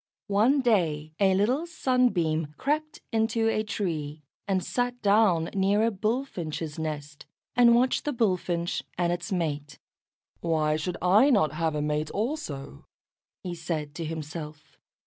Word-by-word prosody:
One 245 +8 +4
day 160 - +1
a 190 -2 +4
little 250 - +1
Sunbeam 180 - +1
crept 305 +2 -2
into 225 0 +1
a 215 - +1
tree, 155 -8 -3 0.2
and 190 -2 +1
sat 245 +5 -1
down 200 -5 +3
near 200 +2 +2
a 230 - +2
Bullfinch's 190 - -3
nest, 150 -2 -5 0.3
and 235 -1 +6
watched 255 +2 +2
the 295 - 0
Bullfinch 180 -7 0 0.2
and 175 -1 +1
its 175 +1 -5
mate. 150 -5 -2 0.6
"Why 155 -2 +1
should 175 +3 -3
I 205 +10 +5
not 195 - +3
have 160 0 -1
a 150 - -1
mate 150 +1 -1
also?" 200 - -4 0.6
he 180 - -4
said 160 -3 -4
to 165 - -5
himself. 155 -1 -7
180 Hz, 140 wpm, -27 LUFS, 155-225 Hz, 0.6 s, and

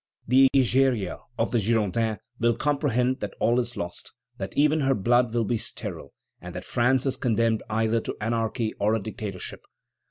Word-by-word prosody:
The 130 +2 +6
Egeria 130 -6 +2 0.2
of 115 - 0
the 120 - +2
Girondins 110 0 +1 0.2
will 120 0 +3
comprehend 130 -3 +1
that 105 - -5
all 120 +2 +3
is 120 -1 -3
lost, 85 0 -6 0.3
that - - -6
even 150 +2 +4
her 135 -2 +2
blood 120 +3 +2
will 115 -1 0
be 115 +1 0
sterile, - - -7 0.3
and - - -9
that - - -6
France 125 +2 +2
is 130 -1 0
condemned 115 -3 +1
either 110 +1 +1
to - - -5
anarchy 115 0 -1
or 105 +2 +2
a - - 0
dictatorship. 105 -3 -6
115 Hz, 170 wpm, -26 LUFS, 110-130 Hz, 0.3 s, The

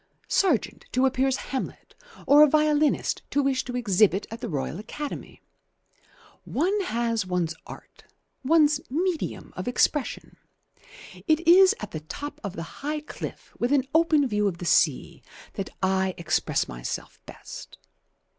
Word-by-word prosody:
Sargent 345 - +1
to 255 +1 +3
appear 265 0 +2
as 265 - +1
'Hamlet' 265 0 -5 0.3
or 290 +1 +7
a 300 - +9
violinist 305 0 +2
to 285 - +1
wish 270 -1 +1
to 245 - -6
exhibit 205 -3 +3
at 230 +2 -7
the 240 - -4
Royal 150 +2 -3
Academy. 290 +7 -7 1.0
One 385 +8 0
has 230 - -1
one's 180 -3 -1
art, - - -13 0.4
one's 300 0 +4
medium 340 +4 -2
of - - -5
expression. 260 +3 0 0.9
It 320 +1 +2
is 370 +2 +7
at 210 - -6
the 155 - -4
top 285 - -8
of 200 -2 -5
the 165 - -4 0.2
high 300 +2 -2
cliff 300 - -8
with 240 +2 0
an 280 -2 +4
open 315 -3 +4
view 210 -3 +1
of 180 -4 -2
the 175 - -7
sea - - +2 0.3
that 195 -3 -4
I 190 0 +1
express 170 - 0
myself - - -6
best. - - -10
260 Hz, 145 wpm, -26 LUFS, 200-300 Hz, 1.0 s, a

